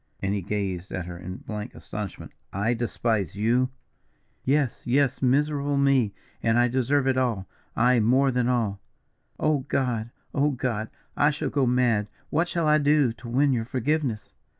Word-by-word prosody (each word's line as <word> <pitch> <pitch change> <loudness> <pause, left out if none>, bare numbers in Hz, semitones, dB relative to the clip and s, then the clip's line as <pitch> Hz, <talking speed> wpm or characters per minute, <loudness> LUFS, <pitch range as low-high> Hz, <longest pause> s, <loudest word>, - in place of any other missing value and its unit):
and 100 0 -1
he 100 - -1
gazed 95 -2 -3
at 90 -2 -3
her 90 0 -7
in 90 +1 -7
blank 105 +2 -6
astonishment; 105 -3 -7 0.2
"I 105 +5 0
despise 115 -5 -1
you?" 120 +5 +2 0.7
"Yes, 140 -2 +1
yes, 135 +1 +1
miserable 145 +2 +2
me, 135 -6 +3 0.3
and 115 0 +2
I 120 0 +4
deserve 130 +3 +1
it 135 -1 +2
all, 115 -7 0 0.3
aye, 125 +1 +4
more 130 +5 +3
than 125 -1 +1
all. 110 -6 0 0.6
Oh, 155 -2 +2
God! 120 -4 -1 0.2
oh, 145 +1 +2
God! 120 -5 -2 0.3
I 145 - +4
shall 150 0 -3
go 135 -3 +2
mad. 120 -4 +2 0.2
What 170 +2 +2
shall 170 -2 -1
I 150 0 +5
do 145 -4 +3
to 120 +1 -10
win 135 +3 +3
your 115 -2 -1
forgiveness?" 130 -2 -1
125 Hz, 165 wpm, -26 LUFS, 110-140 Hz, 0.7 s, I